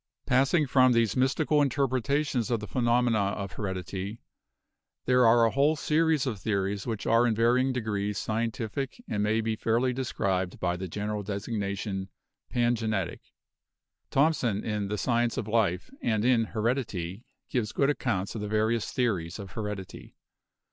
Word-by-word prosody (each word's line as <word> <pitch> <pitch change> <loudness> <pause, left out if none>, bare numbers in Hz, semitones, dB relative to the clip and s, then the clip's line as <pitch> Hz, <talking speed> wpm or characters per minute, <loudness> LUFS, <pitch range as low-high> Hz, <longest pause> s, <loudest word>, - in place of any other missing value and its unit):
Passing 135 +5 +3
from 130 -1 +4
these 115 -3 +2
mystical 145 +3 +2
interpretations 135 -1 0
of 120 -2 +1
the 105 - -6
phe 105 - -8
nomena 120 -4 +2
of 100 -2 -5
heredity, 95 +2 -4 0.9
there 125 -2 +5
are 115 0 +6
a 115 - +2
whole 145 +5 +3
series 155 -1 +2
of 115 -7 -3
theories 100 +1 -1
which 110 -3 -3
are 115 +2 +4
in 115 - +1
varying 125 +4 +3
degrees 105 -4 -2
scientific 115 +4 -2
and 105 - -1
may 110 +2 +2
be 110 0 -1
fairly 120 +3 +1
described 95 -8 -2
by 90 -1 0
the 95 +1 -5
general 105 +3 -3
designation 100 -1 -3 0.4
pangenetic. 115 -6 0 0.9
Thom 155 +4 +4
son 115 -8 -1
in 105 -2 -2
'The 105 +1 -2
Science 120 +2 +1
of 105 - -2
Life' 95 -5 0
and 110 -1 0
in 120 -3 +4
'Heredity' 110 -5 -2 0.2
gives 110 -4 -1
good 140 +1 +2
accounts 100 -9 -2
of 110 - -5
the 105 - -3
various 110 +1 0
theories 95 -10 -1
of 100 -3 -8
heredity. 105 -3 -6
115 Hz, 155 wpm, -28 LUFS, 100-125 Hz, 0.9 s, are